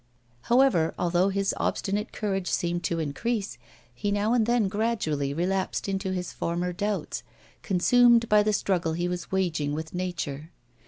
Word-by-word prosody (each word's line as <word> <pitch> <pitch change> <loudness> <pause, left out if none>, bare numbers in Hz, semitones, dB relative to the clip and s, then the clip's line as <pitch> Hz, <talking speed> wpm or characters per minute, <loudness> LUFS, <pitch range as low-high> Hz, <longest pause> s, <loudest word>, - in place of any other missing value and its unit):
However, 240 -10 +4
although 175 +2 +2
his 195 0 0
obstinate 205 +2 -1
courage 195 -3 -2
seemed 175 0 -1
to 170 - 0
increase, 180 - -2 0.3
he 205 +12 -3
now 205 +3 +1
and 230 -3 +2
then 240 -4 +2
gradually 190 -10 -1
relapsed 185 +7 -1
into 195 -1 -2
his 180 -1 -3
former 175 +1 -2
doubts, 205 +2 -2 0.4
consumed 235 +5 +4
by 210 -1 +5
the 215 +1 +1
struggle 180 -5 0
he 175 +2 -1
was 180 -1 -4
waging 165 -6 0
with 160 +1 -5
nature. 165 -5 -4
190 Hz, 150 wpm, -27 LUFS, 170-210 Hz, 0.4 s, by